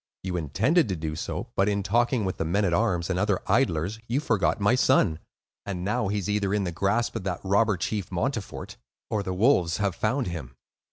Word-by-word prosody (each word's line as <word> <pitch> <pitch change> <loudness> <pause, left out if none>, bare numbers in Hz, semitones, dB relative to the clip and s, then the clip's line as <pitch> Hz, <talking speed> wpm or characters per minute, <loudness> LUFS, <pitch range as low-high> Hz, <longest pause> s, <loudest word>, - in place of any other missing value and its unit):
You 90 -1 -3
intended 110 - +2
to 95 - 0
do 80 -1 -4
so; 115 +8 -5
but 100 +2 +3
in 100 -1 0
talking 120 +2 +1
with 95 - -2
the - - -1
men 100 +6 +1
at 90 - +1
arms 90 -4 +1
and 90 - 0
other 100 -1 +1
idlers, 105 -5 +1
you 125 +4 +1
forgot 110 - +1
my 105 +3 +3
son; 115 -10 +3 0.4
and 90 -3 -4
now, 105 0 0
he 105 +2 -1
is 100 - -3
either 105 -1 0
in 105 - 0
the 90 - -2
grasp 100 +8 0
of 115 - -3
that 90 -3 -2
robber 100 +1 +2
chief 100 +3 -3
Montfort, 105 +4 -3 0.3
or 105 - +1
the 95 -2 -3
wolves 90 - +3
have 100 -2 0
found 120 +9 0
him." 75 - -6
100 Hz, 215 wpm, -26 LUFS, 90-110 Hz, 0.4 s, but